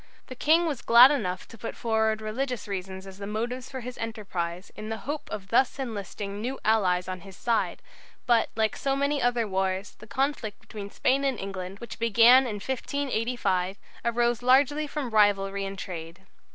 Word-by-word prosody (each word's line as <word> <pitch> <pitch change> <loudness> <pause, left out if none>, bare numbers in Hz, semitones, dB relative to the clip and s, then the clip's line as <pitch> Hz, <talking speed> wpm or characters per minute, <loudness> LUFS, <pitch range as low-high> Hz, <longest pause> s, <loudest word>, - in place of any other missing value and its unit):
The 255 - -7
King 320 +6 +4
was 295 -6 -2
glad 240 +4 +8
enough 185 -10 -2
to 230 - -14
put 230 - -5
forward 220 -1 +1
religious 245 +3 -3
reasons 190 -1 -5
as 195 0 -11
the 200 - -5
motives 235 +4 -3
for 260 -1 -6
his 250 +1 -8
enterprise 190 -6 -4
in 215 +1 -7
the 225 - -2
hope 295 +2 -4
of 195 -2 -6
thus 245 +4 +3
enlisting 205 -4 -5
new 260 +4 -3
allies 185 -5 +2
on 185 0 -4
his 195 +1 -13
side, 235 -2 0 0.4
but, 235 -2 +3
like 220 -1 +1
so 270 -1 0
many 280 +1 0
other 240 -2 +1
wars, 190 0 -1
the 215 - -12
conflict 260 -3 -2
between 210 -2 -8
Spain 270 +6 +1
and 270 -3 +1
England, 190 -1 -5
which 235 +2 -9
began 235 +3 +6
in 215 - -3
1585, 230 -6 -1 0.3
arose 235 0 +1
largely 280 +4 +4
from 285 -4 -4
rivalry 200 -2 +3
in 195 0 -5
trade. 170 -1 -7
220 Hz, 180 wpm, -27 LUFS, 195-255 Hz, 0.4 s, glad